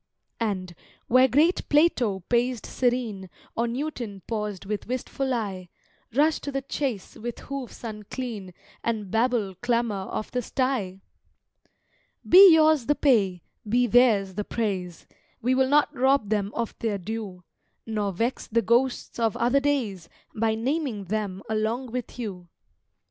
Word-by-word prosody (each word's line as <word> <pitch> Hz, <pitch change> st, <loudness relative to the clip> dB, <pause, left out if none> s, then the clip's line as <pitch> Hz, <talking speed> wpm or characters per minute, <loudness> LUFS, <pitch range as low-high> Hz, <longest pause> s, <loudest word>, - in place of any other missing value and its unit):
And, 190 Hz, -6 st, -2 dB, 0.3 s
where 255 Hz, +2 st, +5 dB
great 300 Hz, +8 st, +2 dB
Plato 255 Hz, -, +3 dB
paced 240 Hz, +4 st, 0 dB
serene, 240 Hz, -7 st, -1 dB, 0.3 s
Or 235 Hz, +1 st, +1 dB
Newton 235 Hz, -, -4 dB
paused 210 Hz, -4 st, -4 dB
with 210 Hz, +1 st, -4 dB
wistful 255 Hz, +2 st, -2 dB
eye, 195 Hz, -7 st, -3 dB, 0.5 s
Rush 305 Hz, +3 st, +3 dB
to 285 Hz, -, -5 dB
the 275 Hz, 0 st, -3 dB
chace 260 Hz, -7 st, -3 dB
with 240 Hz, +1 st, -6 dB
hoofs 275 Hz, -3 st, -7 dB
unclean 215 Hz, -3 st, -6 dB, 0.3 s
And 215 Hz, -5 st, -2 dB
Babel 225 Hz, -4 st, +1 dB
clamour 235 Hz, -5 st, 0 dB
of 215 Hz, -, -4 dB
the 250 Hz, -, -1 dB
sty! 230 Hz, -7 st, -2 dB, 1.3 s
Be 380 Hz, +1 st, +10 dB
yours 315 Hz, -5 st, +4 dB
the 295 Hz, -, +3 dB
pay: 200 Hz, -, +2 dB, 0.3 s
be 245 Hz, +3 st, +3 dB
theirs 225 Hz, -5 st, +4 dB
the 210 Hz, +2 st, -3 dB
praise: 190 Hz, -7 st, -3 dB, 0.3 s
We 250 Hz, +3 st, +1 dB
will 260 Hz, 0 st, +2 dB
not 295 Hz, +1 st, +3 dB
rob 265 Hz, -4 st, +2 dB
them 205 Hz, -1 st, 0 dB
of 235 Hz, -1 st, -2 dB
their 220 Hz, -3 st, -1 dB
due, 195 Hz, -2 st, -6 dB, 0.4 s
Nor 210 Hz, -3 st, -1 dB
vex 230 Hz, +8 st, -2 dB
the 230 Hz, +1 st, +1 dB
ghosts 240 Hz, +1 st, +1 dB
of 225 Hz, -3 st, +1 dB
other 245 Hz, +4 st, +3 dB
days 235 Hz, -, -1 dB, 0.2 s
By 220 Hz, 0 st, +1 dB
naming 255 Hz, -2 st, -2 dB
them 200 Hz, 0 st, -3 dB
along 220 Hz, +3 st, -1 dB
with 250 Hz, 0 st, -5 dB
you. 195 Hz, -7 st, -6 dB
230 Hz, 140 wpm, -26 LUFS, 205-255 Hz, 1.3 s, Be